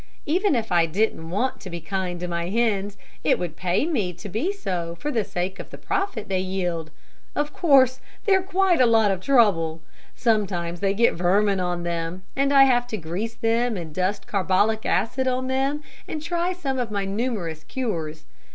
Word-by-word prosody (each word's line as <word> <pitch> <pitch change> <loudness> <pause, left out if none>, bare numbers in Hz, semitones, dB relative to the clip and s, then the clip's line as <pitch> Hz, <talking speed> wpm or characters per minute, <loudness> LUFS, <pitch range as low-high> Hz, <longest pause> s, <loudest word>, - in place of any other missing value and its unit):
Even 355 +2 +2
if 225 -2 -2
I 170 -2 +4
didn't 165 -2 -1
want 225 +9 -1
to 195 - -7
be 170 -1 -5
kind 180 +1 -3
to 180 - -2
my 170 0 -2
hens, 205 -2 0 0.3
it - - +3
would 175 -3 -4
pay 180 - 0
me 220 - -1
to 175 +5 -9
be 230 - 0
so 180 - -3
for 295 - -2
sake 185 0 -3
of - - -8
the - - -9
profit 245 - -2
they 190 -1 0
yield. 180 -4 -2 0.5
Of 295 0 -1
course 265 -6 +4 0.3
they're 385 -3 +4
quite 370 -3 +2
a 250 - +6
lot 225 -3 +4
of 190 -2 -2
trouble. 185 -11 +3 0.4
Sometimes 185 -7 0
they 195 +1 +1
get 235 +3 +4
vermin 195 +3 +2
on 175 -1 -1
them, 170 +1 -3
and 275 +1 +2
I 275 -1 +8
have 245 -2 +3
to 225 -3 -3
grease 190 +7 -4
them 230 0 +1
and 165 -3 -6
dust 185 +4 -1
carbolic 205 +3 +1
acid 260 +3 +1
on 255 0 0
them, 270 +3 0 0.2
and 310 - -4
try 345 +3 -1
some 280 -8 -3
of 245 -3 -1
my 200 -2 -2
numerous 195 -7 -2
cures. 160 -12 -4
205 Hz, 190 wpm, -24 LUFS, 180-260 Hz, 0.5 s, I